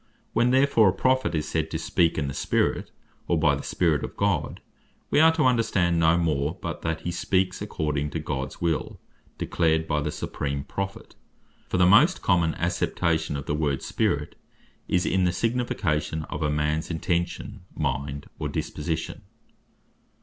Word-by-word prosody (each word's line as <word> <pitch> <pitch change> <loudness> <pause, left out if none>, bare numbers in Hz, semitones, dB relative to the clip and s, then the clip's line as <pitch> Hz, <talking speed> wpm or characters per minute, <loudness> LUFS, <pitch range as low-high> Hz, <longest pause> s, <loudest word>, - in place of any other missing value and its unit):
When 120 +2 +3
therefore 130 -5 +5
a - - 0
Prophet 130 -10 +1
is 75 -1 -1
said 80 -1 -1
to 80 - -2
speak 85 +1 +1
in 75 -2 -1
the 70 - -4
Spirit, - - 0 0.4
or 85 - +2
by 75 -2 +3
the 70 - -2
Spirit 80 -3 +1
of - - -6
God, 95 -7 0 0.5
we - - +4
are 160 +1 +7
to 160 -3 +1
understand 100 -9 +2
no 80 +1 +4
more, 80 -1 0
but 85 -4 -5
that 80 -1 -2
he 90 - -3
speaks 95 +1 0
according 75 -7 -2
to 80 - -4
Gods 70 -3 -4
will, 85 -2 -1 0.4
declared 80 -1 +1
by 75 -1 0
the - - -2
supreme 70 -1 -3
Prophet. 95 +5 -5 0.6
For - - 0
the 90 - +5
most 135 - +5
common 85 -3 +2
acceptation 80 -4 0
of 70 - -6
the - - -1
word 75 -3 -1
Spirit, - - -1 0.5
is 90 0 +1
in 95 -1 +2
the 90 - +2
signification 80 -9 -1
of - - -4
a 75 - +1
mans 75 +1 0
intention, 85 +5 -2
mind, 70 +2 -2
or - - -2
disposition. 80 +1 -3
85 Hz, 165 wpm, -26 LUFS, 75-95 Hz, 0.6 s, are